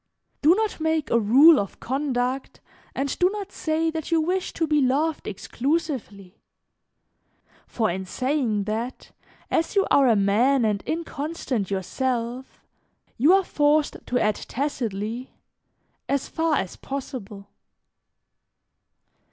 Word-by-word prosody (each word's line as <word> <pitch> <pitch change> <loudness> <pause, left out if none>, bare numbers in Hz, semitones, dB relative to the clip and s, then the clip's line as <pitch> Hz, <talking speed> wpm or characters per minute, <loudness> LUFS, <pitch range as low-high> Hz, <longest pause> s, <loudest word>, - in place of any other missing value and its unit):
"Do 315 +5 +6
not 435 -3 -1
make 320 -1 0
a 235 - +4
rule 275 +9 +7
of 200 - -5
conduct 260 -1 -2 0.4
and 275 0 -2
do 360 - +4
not 405 -1 -6
say 320 +1 -1
that 320 -1 -5
you 330 - +3
wish 360 +4 -1
to 330 - 0
be 300 -1 +2
loved 285 +5 0
exclusively, 240 - -3 1.3
for 225 -2 0
in 190 +2 -4
saying 255 -2 -1
that, 225 +5 -4 0.4
as 330 - 0
you 395 - +4
are 275 -2 +5
a 230 - +5
man 225 +6 +3
and 205 -2 0
inconstant 305 - -3
yourself, 240 +5 -3 0.6
you 290 +8 +5
are 385 +1 +5
forced 295 -2 +2
to 250 - 0
add 215 -1 +1
tacitly: 235 -3 -4 0.7
'As 280 -1 0
far 325 -1 0
as 190 -7 -3
possible.' 230 -7 -7
270 Hz, 125 wpm, -24 LUFS, 225-315 Hz, 1.3 s, rule